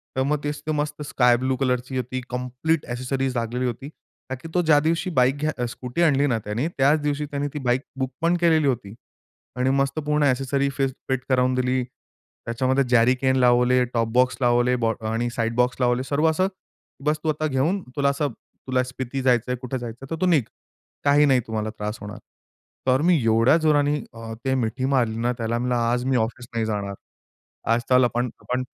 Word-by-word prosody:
तर 130 - +1
मग 150 +1 -1
ते 150 +1 -3
मस्त 150 0 -2
स्कायब्लू 125 0 +2
कलरची 125 -1 -1
होती. 130 +1 -3
कंप्लीट 125 +6 -1
ॲक्सेसरीज 130 +1 -2
लागलेली 120 +2 -2
होती, 125 +2 -4
कारण 130 -4 -11
की 165 - -8
तो 180 - +3
ज्या 155 -3 +5
दिवशी 165 +4 0
बाईक 130 -3 +3
घ्या 150 -4 -2
स्कूटी 125 +6 -4
आणली 145 -2 +3
ना 120 - +1
त्याने 115 +9 -1
त्याच 140 +3 +4
दिवशी 145 0 -1
त्याने 145 0 -3
ती 150 - -4
बाईक 125 0 +1 0.2
बुकपण 150 +7 0
केलेली 160 -4 +4
होती 120 -6 -2 0.6
आणि 125 +1 +1
मस्त 140 +3 0
पूर्ण 150 0 0
ॲक्सेसरी 135 +1 +1
फेस 135 -1 +1 0.2
फिट 130 -1 0
करावून 130 0 +3
दिली. 130 0 +1 0.6
त्याच्यामध्ये 130 +3 +1
जॅरीकेन 125 +2 +3
लावले, 125 0 +4
टॉप 115 -1 +1
बॉक्स 125 +1 +3
लावले, 120 +1 +3
बॉ 115 0 +2 0.2
आणि 115 +1 -1
अ, - - -1
साइड 115 0 -1
बॉक्स 125 +1 +1
लावले 125 0 +2
सर्व 145 +4 +1
असं. 185 +4 +1 0.6
"बस, 150 +1 +1
तू 160 - 0
आता 155 0 0
घेऊन 155 +8 0
तुला 140 -1 +2
असं 145 +1 -1 0.4
तुला 130 -1 +1
स्पिती 130 +1 -5
जायचं 125 -1 +2
आहे, 125 - -1
कुठे 130 0 -3
जायचं 120 -1 -7
आहे, 135 - -11
तर 165 - -4
तू 185 - +3
निघ. 155 -7 +4 0.6
काही 145 +1 +5
नाही 135 -2 +4
तुम्हाला 110 -1 -2
त्रास 105 +2 -4
होणार." 105 0 -7 0.7
तर 130 +1 +3
मी 175 -5 +4
एवढ्या 115 +6 +4
जोराने 150 -2 +2 0.2
अ, 115 0 -8
ते 130 - +1
मिठी 125 +1 -1
मारली 115 -4 +1
ना 120 +1 +1
त्याला. 115 0 -1
म्हणलं, 125 0 0
"आज 120 +1 0
मी 130 - +1
ऑफिस 120 +1 -2
नाही 115 -1 0
जाणार. 100 -2 -3 0.8
आज 120 - +1
चल 125 0 +5
आपण, 120 +1 0
आपण 125 +1 -2
130 Hz, 195 wpm, -23 LUFS, 120-145 Hz, 0.8 s, ज्या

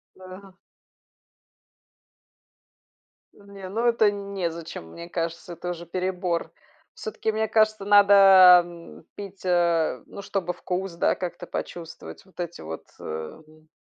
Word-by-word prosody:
Да. 185 +1 -12 2.8
Не, 200 -2 -11
ну, 230 +5 -2
это 230 -2 +4
н 200 -1 -6
незачем, 165 - -5
мне 170 +1 -10
кажется, 170 +1 -4
это 175 +2 -6
уже 175 -1 -6
перебор. 180 -1 -2 0.4
Всё-таки, 415 - -3
мне 220 0 -1
кажется, 215 -1 +2
надо, 195 -3 +8
м, 170 -2 -13
пить, 200 -1 -9
э, 170 -3 +1
ну 200 - -10
чтобы 185 -3 -3
вкус, 180 +1 -4
да, 170 - +1
как-то 175 -1 -6
почувствовать, 165 -2 -7
вот 190 - -24
эти 175 -1 -5
вот, 80 0 -7 0.2
э, - - -12
м 155 - -9
180 Hz, 125 wpm, -25 LUFS, 170-200 Hz, 2.8 s, надо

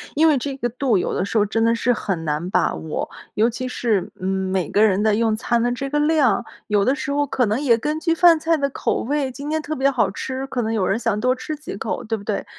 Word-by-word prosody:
因 315 +2 +5
为 300 -3 +4
这 270 +1 -4
个 240 -3 -1
度， 245 -3 +1
有 - - -1
的 - - 0
时 220 - -2
候 210 - +4
真 225 +2 0
的 230 0 +3
是 240 +2 +1
很 180 -7 -3
难 155 +4 -2
把 - - +1
握。 160 -1 -4 0.3
尤 225 +3 +3
其 255 +2 -4
是， 225 -6 -1
嗯， 185 - -3
每 190 -2 -1
个 210 - +3
人 195 -1 +2
的 215 -1 +3
用 225 0 +1
餐 235 +1 0
的 245 - +1
这 275 +3 -3
个 295 - -1
量。 295 -8 +3 0.2
有 205 -2 +2
的 260 +6 +3
时 270 0 -4
候 290 0 +1
可 255 -2 0
能 215 +4 0
也 245 -6 +3
根 300 +6 -2
据 330 -1 +2
饭 335 -1 +6
菜 325 +1 +1
的 280 -1 0
口 - - -1
味， 275 +1 -1
今 285 +3 -7
天 315 0 0
特 310 +1 -4
别 270 0 +2
好 235 -8 +1
吃。 260 +5 -4
可 250 -2 -2
能 220 0 -1
有 200 -4 +1
人 200 +5 0
想 230 -3 0
多 255 +3 +2
吃 260 +4 -5
几 295 -8 -8
口， - - -3
对 225 0 -2
不 200 - -11
对？ 210 -1 -2
240 Hz, 295 characters per minute, -21 LUFS, 210-280 Hz, 0.3 s, 饭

